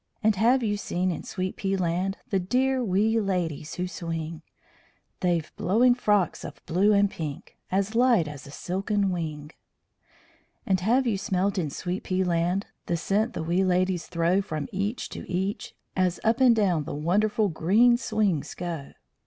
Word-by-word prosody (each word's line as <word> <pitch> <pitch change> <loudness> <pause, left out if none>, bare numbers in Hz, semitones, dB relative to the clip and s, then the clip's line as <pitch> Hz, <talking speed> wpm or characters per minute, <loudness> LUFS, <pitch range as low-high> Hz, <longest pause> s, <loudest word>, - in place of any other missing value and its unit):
And 215 -1 +4
have 245 +5 +3
you 205 -2 0
seen 185 -2 -1
in - - -4
Sweet 185 0 -4
pea 195 0 -1
Land 185 +2 -1
The 195 - +2
dear 255 +7 +1
wee 215 +2 +2
ladies 175 -7 -2
who 180 +1 -2
swing? 165 -2 -5 0.8
They've 170 -3 -1
blowing 240 +6 +4
frocks 210 -7 +1
of - - -8
blue 185 +5 +3
and 200 -1 +4
pink 155 -7 -7 0.2
As 195 +3 0
light 235 -8 +4
as 145 -1 -9
a - - -10
silken 195 +6 -1
wing. 155 -4 -4 1.1
And 190 -1 +2
have 240 +8 +2
you 215 -5 0
smelt 195 +1 0
in 160 -4 -1
Sweet 180 +6 -4
pea 185 0 0
Land 175 +2 0 0.2
The 170 - 0
scent 215 +8 0
the - - -3
wee 175 +4 +1
ladies 185 -1 +1
throw 170 +3 +1
From 155 -6 -4
each 205 +5 -2
to - - -8
each, 190 +3 -3 0.2
as 185 -2 +1
up 230 +4 +2
and 250 -3 +6
down 180 -8 +1
The - - -5
wonderful 205 +7 +1
green 205 +9 +4
swings 215 - -1
go? 170 -6 -5
190 Hz, 170 wpm, -26 LUFS, 170-210 Hz, 1.1 s, and